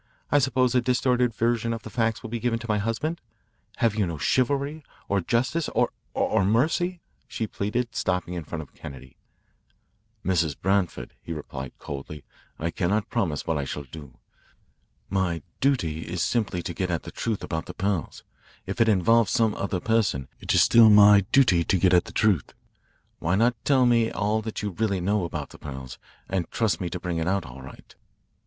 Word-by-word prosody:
I 145 - +5
suppose 130 -2 +2
a 125 - +4
distorted 125 -1 +2
version 115 +1 0
of 115 - -6
the - - -9
facts 115 -1 0
will 115 - -7
be 120 - -2
given 115 0 0
to 115 0 -8
my 105 -1 +1
husband. 130 +11 -2 0.5
Have 115 -3 +2
you 105 -3 0
no 85 -2 -4
chivalry, 140 - 0 0.2
or 100 -1 +1
justice, 130 - 0
or - - +2 0.2
or 110 -3 +2
mercy?" 160 - +1 0.3
she 110 - -3
pleaded, 115 +4 -3
stopping 90 -1 -1
in 85 -2 -4
front 80 +1 -5
of 70 - -18
Kennedy. 65 -1 -11 1.1
"Mrs. 85 -6 +1
Branford," 95 -2 0
he 85 - -6
replied 65 -4 -7
coldly, 70 +1 -7 0.3
"I 85 +2 -2
cannot 105 +3 -1
promise 75 -7 -1
what 80 -2 0
I - - -1
shall 70 +2 -5
do. 70 -1 -12 0.9
My 90 -3 -1 0.2
duty 85 - +1
is 85 0 -2
simply 100 -7 -1
to 85 - -4
get 90 +1 -2
at 85 -2 -1
the - - -8
truth 110 -3 -3
about 80 -1 -4
the - - -8
pearls. 95 -5 -2 0.4
If 100 +5 -2
it 115 - +5
involves 110 +2 +4
some 115 -3 +2
other 100 -2 -2
person, 105 - 0
it - - -3
is - - +7
still 115 -1 +7
my 105 -1 +7
duty 105 -11 +5
to 95 - +2
get 90 +1 +3
at 90 - +4
the - - -9
truth. 100 -9 +1 0.6
Why 85 +3 +1
not 115 +4 +3
tell 130 -3 +4
me 115 -2 +3
all 105 +1 0
that 110 -1 -5
you 105 - -2
really 100 0 -1
know 100 +1 0
about 75 -4 -5
the - - -13
pearls 65 -3 -8 0.3
and 95 -3 -2
trust 110 -3 0
me 90 - -2
to - - -5
bring 85 -2 -3
it 80 - -1
out 95 -1 0
all 65 +1 -10
right?" 65 - -13
100 Hz, 190 wpm, -25 LUFS, 85-115 Hz, 1.1 s, is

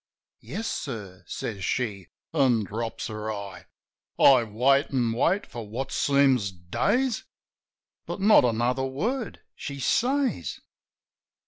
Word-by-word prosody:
"Yes, 225 - -6
sir," 100 -9 -5
says 100 -4 -5
she, 100 -5 -2 0.3
an' 130 -7 +3
drops 115 +4 -4
her 110 0 -4
eye.... 100 -4 -7 0.5
I 130 -3 +7
wait, 130 +7 +3
an' 120 -4 0
wait 175 - +1
for 115 -3 -8
what 130 +5 -4
seems 135 -7 +3
days; 220 - 0 0.8
But - - -4
not 205 +3 +6
another 120 +2 +1
word 210 - -3
she 140 -1 -7
says. 245 - 0
125 Hz, 115 wpm, -26 LUFS, 105-140 Hz, 0.8 s, I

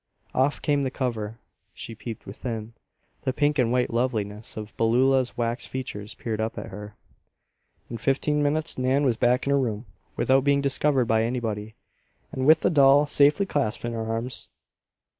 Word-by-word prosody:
Off 135 +3 +1
came 145 -1 +2
the 135 - 0
cover. 115 -5 -3 0.4
She 115 - -7
peeped 115 0 -8
within. 110 +2 -6 0.5
The 130 - -1
pink 145 +1 +1
and 120 -2 +2
white 125 0 +1
loveliness 110 -4 -2
of 110 0 -7
Beulah's 130 +3 +2
wax 120 0 -2
features 110 -5 -6
peered 110 -2 -3
up 110 +1 -3
at - - -6
her. 105 +2 -9 0.9
In 115 - -6
fifteen 150 +4 +1
minutes 155 0 0
Nan 130 +3 +2
was 125 -4 +2
back 125 +3 +2
in 140 - 0
her 140 - +4
room, 115 -3 -2 0.3
without 130 0 +3
being 140 0 +3
discovered 140 -1 +2
by 110 0 +2
anybody, 110 -3 -3 0.6
and 130 +1 -2
with 155 - +6
the - - +2
doll 140 -1 +6
safely 145 +6 +3
clasped 140 - -2
in 120 - -3
her 115 -1 -3
arms. 115 +2 -2
125 Hz, 170 wpm, -25 LUFS, 110-140 Hz, 0.9 s, with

